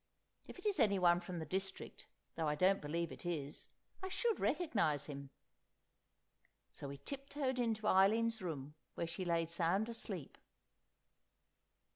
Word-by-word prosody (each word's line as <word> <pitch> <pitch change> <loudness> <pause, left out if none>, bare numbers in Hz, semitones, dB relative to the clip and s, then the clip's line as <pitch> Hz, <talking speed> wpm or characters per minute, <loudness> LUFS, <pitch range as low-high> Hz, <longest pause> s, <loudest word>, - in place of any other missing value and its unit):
If - - -9
it 365 - -12
is 405 -5 +2
anyone 185 -6 +5
from 175 0 -6
the 160 - -3
district—though 190 -2 -4
I 150 - +2
don't 190 +5 +4
believe 165 +2 -2
it - - -9
is—I 170 - -5
should 460 +3 +1
recognise 185 - +1
him." 140 -2 -6 1.4
So 140 - -7
we 140 0 -6
tip 275 - -6
toed 265 -3 -1
into 225 -3 0
Eileen's 220 +3 +4
room, 150 -5 -4 0.2
where - - -1
she 170 +3 -4
lay 170 -1 +2
sound 170 +6 +1
asleep. 205 -9 -5
185 Hz, 135 wpm, -38 LUFS, 160-225 Hz, 1.4 s, anyone